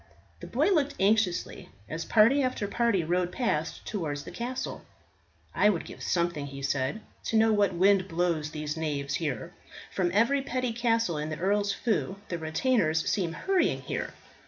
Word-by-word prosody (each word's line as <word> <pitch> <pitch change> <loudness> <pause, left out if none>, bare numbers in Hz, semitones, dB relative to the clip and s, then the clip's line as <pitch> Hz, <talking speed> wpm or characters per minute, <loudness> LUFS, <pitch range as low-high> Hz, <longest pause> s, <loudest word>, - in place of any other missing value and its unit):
The - - -8
boy - - +2
looked 300 -6 +2
anxiously 200 -2 +1 0.2
as 165 +2 -4
party 230 +6 +5
after 255 -6 -1
party 230 -4 +1
rode 175 +2 0
past 165 -11 -2
towards 150 -8 -3
the - - -9
castle. 250 +2 -4 0.7
"I 210 - +4
would 180 -6 -1
give - - -10
something," 170 -5 0
he 140 0 -8
said, 135 +8 -1 0.2
"to 225 - +1
know 220 0 +5
what 200 -3 +2
wind 190 +1 +4
blows 165 -3 0
these 150 0 -4
knaves 145 -3 -2
here. 145 -9 -3 0.4
From 180 -2 0
every 235 +8 +3
petty 255 -2 -2
castle 230 -8 +1
in 150 +1 -3
the 155 - -4
Earl's 200 +2 +1
feu 205 -3 -1
the 170 - -3
retainers 160 0 +1
seem 180 -6 0
hurrying 380 - +1
here. - - -4
185 Hz, 165 wpm, -28 LUFS, 160-225 Hz, 0.7 s, party